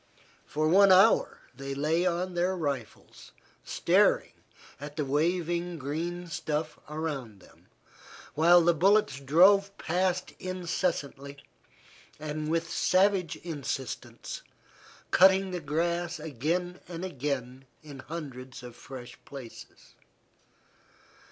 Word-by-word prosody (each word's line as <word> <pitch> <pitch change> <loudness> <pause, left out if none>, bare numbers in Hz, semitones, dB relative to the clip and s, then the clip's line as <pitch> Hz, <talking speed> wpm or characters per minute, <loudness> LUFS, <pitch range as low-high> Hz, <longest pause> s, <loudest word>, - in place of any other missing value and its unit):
For 155 +1 0
one 195 +4 +6
hour 195 +5 +5
they 135 +1 -5
lay 160 +5 +1
on 180 +1 -1
their 180 +2 0
rifles 140 -8 -5 0.3
staring - - +2 0.5
at 145 +1 -8
the 150 - -1
waving 170 +4 0
green 165 +5 -4
stuff 155 -2 -3
around 145 -9 -4
them, - - -21 0.7
while 170 +3 +6
the 170 +1 +4
bullets 190 -3 +3
drove 195 +8 +4
past 180 +1 -1
incessantly, 170 -6 -3 0.8
with 155 +2 -2
savage 185 -1 +2
insistence, 140 -6 -5 0.7
cutting 190 +1 +5
the 180 - -3
grass 170 +3 -1
again 160 +5 -2
and 175 +1 -5
again 135 -5 -4 0.2
in 145 -3 -10
hundreds 130 -4 -8
of 120 -1 -10
fresh 120 -1 -10
places. 130 -5 -12
160 Hz, 100 wpm, -29 LUFS, 140-180 Hz, 0.8 s, one